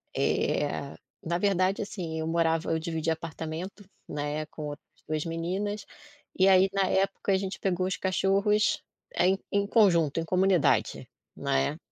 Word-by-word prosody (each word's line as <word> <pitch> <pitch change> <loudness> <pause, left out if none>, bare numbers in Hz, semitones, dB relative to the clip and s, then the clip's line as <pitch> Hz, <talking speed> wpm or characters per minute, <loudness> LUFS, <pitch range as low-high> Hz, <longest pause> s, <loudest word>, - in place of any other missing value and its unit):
eh, 140 -1 0 0.3
na 170 +1 -1
verdade, 190 0 +1
assim, 175 -6 -4
eu 160 - -2
morava 165 0 +1
eu 160 - +1
dividia 160 -1 -1
apartamento, 165 +4 -7 0.2
né, 150 +1 -3
com 155 - -9
outras 145 0 -8 0.2
2 155 0 -2
meninas, 190 +5 -3 0.5
e 190 +1 +5
aí 190 0 +6
na 195 -1 +2
época 195 +1 0
a - - +4
gente 190 0 -4
pegou 185 -1 0
os 190 - -1
cachorros, 200 +3 +2 0.3
eh, 180 - +3
em 190 +1 +2
em 200 0 +2
conjunto, 170 - +3
em 165 - -2
comunidade, 180 -3 +2 0.3
né. 70 0 0
180 Hz, 150 wpm, -28 LUFS, 160-195 Hz, 0.5 s, aí